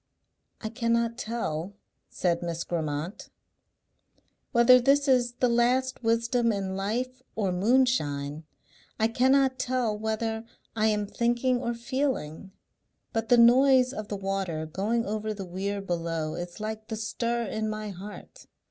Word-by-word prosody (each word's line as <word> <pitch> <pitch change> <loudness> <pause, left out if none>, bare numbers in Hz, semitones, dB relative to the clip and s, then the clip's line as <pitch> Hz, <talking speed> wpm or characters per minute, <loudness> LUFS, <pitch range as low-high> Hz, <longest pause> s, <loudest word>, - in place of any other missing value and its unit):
"I 220 - -3
cannot 230 0 0
tell," 205 -7 -3 0.3
said 170 -2 0
Miss 170 -1 -3
Grammont, 160 +1 -4 1.2
"whether 250 0 +7
this 280 +3 +3
is 245 -2 +3
the 250 +1 +1
last 250 +2 +1
wisdom 230 +1 +2
in 195 -2 -3
life 240 +6 -2
or 200 -4 0
moonshine. 180 - +1 0.6
I 220 - +4
cannot 260 +3 +3
tell 250 -4 0
whether 220 +1 -2 0.3
I 220 -1 +2
am 210 -1 +1
thinking 240 +3 0
or 235 -2 -2
feeling; 235 - -3 0.6
but 225 -1 -2
the 245 - +6
noise 255 +2 +6
of 215 -5 -5
the 205 - -4
water 195 -5 -2
going 210 +8 -1
over 215 +1 -3
the 195 -2 -6
weir 195 +3 -3
below 165 -4 -2
is 175 +3 -6
like 215 0 -5
the 220 - -4
stir 235 +2 -2
in 220 0 -2
my 215 -1 -4
heart. 200 +3 -11
220 Hz, 140 wpm, -27 LUFS, 195-240 Hz, 1.2 s, whether